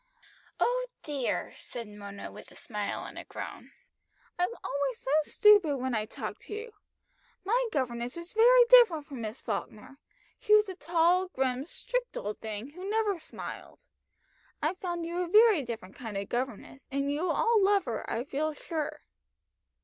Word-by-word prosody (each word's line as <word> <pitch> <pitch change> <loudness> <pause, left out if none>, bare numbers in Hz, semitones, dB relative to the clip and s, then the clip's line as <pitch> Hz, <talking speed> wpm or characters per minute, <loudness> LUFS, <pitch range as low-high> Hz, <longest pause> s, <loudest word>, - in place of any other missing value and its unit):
"Oh - - +1 0.2
dear!" 285 -5 -2
said 235 -2 -8
Mona 200 -1 -8
with - - -12
a - - -17
smile - - -4
and - - -8
a - - -7
groan. - - -8 0.7
"I'm 360 - +2
always 275 -4 -1
so 265 - -4
stupid 375 -3 +5
when 260 0 -2
I 215 -2 0
talk - - -6
to 420 - -7
you. 450 +2 -6 0.7
My 475 +6 +2
governess 245 -3 -2
was 340 +1 -7
very 485 +2 +7
different 470 -11 +7
from 275 -6 -7
Miss 220 +3 -5
Falkner 215 +4 -5 0.4
she 425 - +5
was 425 0 +5
a 375 - -5
tall, 345 +2 +2
grim, 265 -5 -1
strict - - -3
old 210 +1 -4
thing, 220 +4 -6
who 365 +5 -7
never 420 -4 +1
smiled. 410 - -8 0.7
I've 325 +5 -1
found 345 -2 -3
you 340 +1 -3
a 360 - 0
very 425 -2 +6
different 225 -6 -6
kind 225 -5 -6
of 200 0 -4
governess, 255 +1 -4
and 275 +1 -1
you 290 +2 -1
will - - +1
all 460 -3 +3
love 395 -1 +3
her, 230 -4 -3
I 230 - -1
feel 300 +3 -2
sure." 310 -1 -4
310 Hz, 170 wpm, -30 LUFS, 250-405 Hz, 0.7 s, very